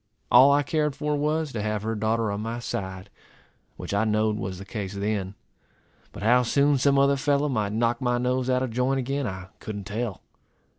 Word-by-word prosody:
All 130 +3 +8
I 145 +1 +3
cared 150 -1 0
for 150 +1 -1
was, 150 +1 0
to 110 - -3
have 105 0 -2
her 110 +1 -1
daughter 110 0 0
on 100 +1 -3
my 115 +2 -4
side, 95 -4 -5 0.7
which - - -6
I 100 +2 +2
knowed 110 0 +1
was 95 -3 -4
the 100 - -9
case 100 -2 -5
then; 100 -1 -2 0.8
but - - -9
how 120 +3 +5
soon 140 +3 +2
some 140 +1 +3
other 140 0 +4
fellow 145 +1 +1
might 110 -7 -1
knock 115 +1 0
my 120 -1 +1
nose 125 +1 0
out 130 0 +2
of 130 - -3
joint 125 +3 +1
again, 135 +1 -2
I 95 -2 -7
couldn't 105 -2 -6
tell. 110 -1 -4
120 Hz, 200 wpm, -25 LUFS, 105-135 Hz, 0.8 s, All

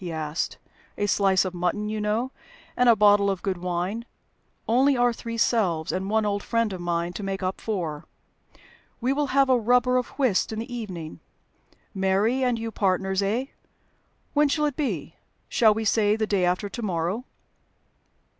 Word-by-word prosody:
he 175 - -4
asked. 155 0 -3 0.4
"A 205 - 0
slice 195 -2 +3
of 185 - -3
mutton, 180 +4 -1
you 215 0 -3
know, 220 +5 -1 0.4
and 250 0 +4
a 230 - +7
bottle 205 -1 +5
of 195 -2 -3
good 190 -3 -2
wine. 180 +5 -2 0.6
Only 260 +4 +3
our 245 0 +3
three 230 0 -6
selves, 185 -9 +1
and 190 +1 -3
one 220 0 +2
old 205 -1 -1
friend 230 -2 0
of 180 - -6
mine 170 0 -1
to - - -6
make 195 -1 -3
up 185 +1 -2
four. 170 -9 -3 0.9
We 255 +3 +1
will 290 +1 0
have 275 0 +3
a 255 -2 +4
rubber 250 +2 +3
of 250 - 0
whist 255 -10 +1
in 220 - -4
the 230 +3 -5
evening. 180 -9 -6 0.7
Mary 200 +6 +1
and 250 -2 +1
you 225 0 -4
partners 190 -1 0
eh? 220 +6 0 0.9
When 295 0 +3
shall 300 +1 +1
it 290 -3 -1
be? 200 - -3 0.3
Shall 220 -3 +4
we 220 0 -2
say 210 0 +3
the 220 0 0
day 200 -4 +1
after 180 +3 0
to 235 +4 -7
morrow?" 185 +4 -2
210 Hz, 180 wpm, -25 LUFS, 185-240 Hz, 0.9 s, a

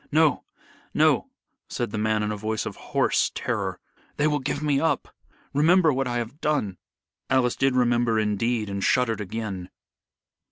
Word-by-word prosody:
"No! 155 0 +3 0.5
no!" - - +3 0.4
said - - -3
the 110 - -3
man 110 0 +1
in 105 - -1
a - - -2
voice 110 +1 -2
of - - -5
hoarse - - +1
terror. - - -2 0.4
"They 150 - +2
will 150 -1 +2
give 145 +2 -3
me 145 -2 +2
up. 160 +2 -1 0.4
Remember 160 +2 +4
what 135 0 -1
I 120 -1 -1
have 120 +6 -5
done." 110 -12 0 0.5
Alice 130 -2 +2
did 135 -1 +1
remember 120 -2 +2
indeed, 110 +1 0
and 100 -1 -3
shuddered 115 -4 +2
again. 100 -3 -5
120 Hz, 160 wpm, -25 LUFS, 110-140 Hz, 0.5 s, Remember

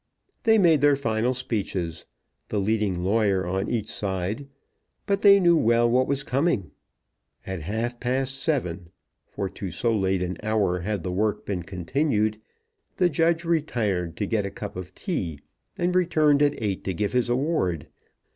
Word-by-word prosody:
They 220 -1 +6
made 165 -7 +5
their 145 -1 +5
final 120 -1 0
speeches, 95 -9 -3 0.4
the 105 - -2
leading 100 -3 0
lawyer 100 -2 +2
on 95 +2 -2
each 115 -4 -1
side, 100 +7 -3 0.6
but 200 0 0
they 200 -1 +8
knew 175 -2 +5
well 120 -4 +3
what 125 +2 +2
was 140 -1 -1
coming. 135 - 0 0.7
At 95 -3 -4
half 115 +8 -3
past 130 +2 -1
seven, 90 - -1 0.4
for 100 - -4
to 95 0 -6
so 115 +7 0
late 95 -2 +1
an 90 +1 -3
hour 105 -4 +1
had 100 0 -3
the 90 - -3
work 105 +2 -1
been 95 -3 -2
continued, 105 - -1 0.6
the 180 -1 +4
judge 165 +2 +1
retired 110 - -1
to 105 - -1
get 105 0 0
a 100 - -3
cup 100 +1 -7
of 90 -1 -8
tea, 90 - -3 0.4
and 175 +1 0
returned 155 -5 +3
at 145 0 +2
eight 100 -4 -2
to 95 - -2
give 105 +5 -1
his 125 -1 +1
award. 120 - 0
110 Hz, 165 wpm, -25 LUFS, 95-140 Hz, 0.7 s, they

